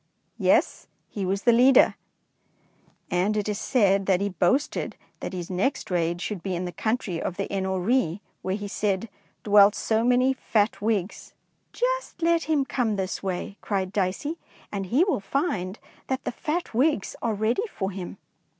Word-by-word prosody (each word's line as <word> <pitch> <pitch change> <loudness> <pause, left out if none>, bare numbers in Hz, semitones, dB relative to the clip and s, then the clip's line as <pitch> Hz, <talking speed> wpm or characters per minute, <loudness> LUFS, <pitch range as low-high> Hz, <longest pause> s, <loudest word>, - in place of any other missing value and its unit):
"Yes, - - +2 0.2
he 195 -3 -3
was 195 +2 -1
the 240 - +6
leader, 250 +3 +6 1.2
and 185 +4 +1
it 210 - -1
is 210 -1 -2
said 200 -6 +2
that 190 -2 +3
he 200 +1 0
boasted 190 - 0 0.2
that - - -5
his 180 -1 -5
next 195 +5 -1
raid 170 0 0
should 205 -2 -4
be 190 -1 -2
in 180 +1 -3
the 175 - -4
country 220 -5 -2
of 180 - -3
the 200 - -1
Eno 190 -1 -1
ree, 200 -2 +1 0.2
where 190 0 -1
he 205 0 -5
said 200 +1 -1 0.2
' - - -41
dwelt 205 0 +6
so 220 0 +1
many 250 +2 +4
fat 220 -5 0
Whigs.' 210 -3 -2 0.2
" - - -45
"Just - - -2
let 335 -1 +3
him 300 -3 +1
come 235 -5 0
this 190 -1 -3
way," 195 +1 -4
cried 190 -2 -2
Dicey, 205 - -1 0.2
" - - -26
and 195 -2 -3
he 260 - +3
will 385 - +1
find 200 - -2 0.3
that 265 0 -2
the - - -2
fat 320 +6 -3
Whigs 260 -2 +1
are 225 -2 0
ready 230 - 0
for 190 -1 -3
him." 190 0 -7
205 Hz, 180 wpm, -26 LUFS, 190-250 Hz, 1.2 s, the